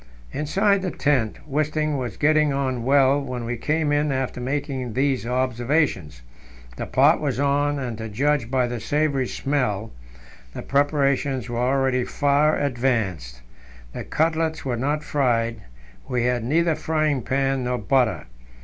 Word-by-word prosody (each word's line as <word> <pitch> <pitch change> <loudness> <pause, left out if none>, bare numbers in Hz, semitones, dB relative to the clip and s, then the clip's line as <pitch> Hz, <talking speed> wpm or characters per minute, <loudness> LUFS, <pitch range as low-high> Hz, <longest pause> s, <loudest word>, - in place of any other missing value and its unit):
Inside 195 +6 +1
the 185 - -2
tent 140 -10 0
Wisting 155 +1 0
was 125 -7 -4
getting 150 0 +3
on 130 -3 -1
well 135 +1 +4
when 125 -3 -5
we 120 +1 -2
came 150 +5 0
in 145 0 +1
after 130 -2 -2
making 130 -2 -3
these 130 -2 0
observations. 125 - -1 0.5
The - - -5
pot 145 +5 +4
was 140 -4 -1
on, 145 +1 +1
and, 120 -5 -4
to 110 0 -5
judge 135 +2 0
by 130 -1 +2
the 120 -1 -4
savoury 140 +1 0
smell, 115 -8 -2 0.6
the - - -6
preparations 140 -2 +1
were 120 0 -3
already 130 0 +1
far 145 +4 +2
advanced. 110 - -1 0.5
The - - -5
cutlets 160 0 -1
were 125 -3 -1
not 145 +5 -1
fried; 115 -5 0 0.5
we 125 -2 0
had 125 -1 0
neither 165 +6 +2
frying 155 -3 0
pan 135 +1 0
nor 125 0 -1
butter. 130 -3 +1
135 Hz, 145 wpm, -23 LUFS, 120-145 Hz, 0.6 s, well